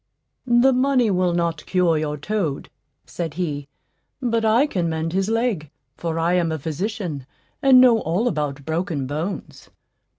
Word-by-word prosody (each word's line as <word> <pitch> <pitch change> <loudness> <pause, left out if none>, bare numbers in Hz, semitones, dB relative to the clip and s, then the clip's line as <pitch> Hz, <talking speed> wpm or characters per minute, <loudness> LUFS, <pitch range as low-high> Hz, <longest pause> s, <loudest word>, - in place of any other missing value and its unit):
"The 240 +2 +5
money 255 -3 +2
will 180 -1 +1
not 170 -3 -1
cure 180 -3 +2
your 150 -1 -2
toad," 160 -3 -3 0.3
said 165 -4 -5
he; 150 -5 -3 0.5
"but 230 -3 0
I 225 +5 +4
can 180 - -1
mend 160 +1 -2
his 195 +2 0
leg, 225 - 0 0.3
for 165 0 -3
I 165 +2 +1
am 175 -2 +1
a 160 - -1
physician, 160 - -4 0.3
and 270 -3 +7
know 245 -3 +6
all 185 +7 0
about 145 - -2
broken 160 -3 -2
bones." 155 +8 -5
175 Hz, 155 wpm, -22 LUFS, 155-225 Hz, 0.5 s, and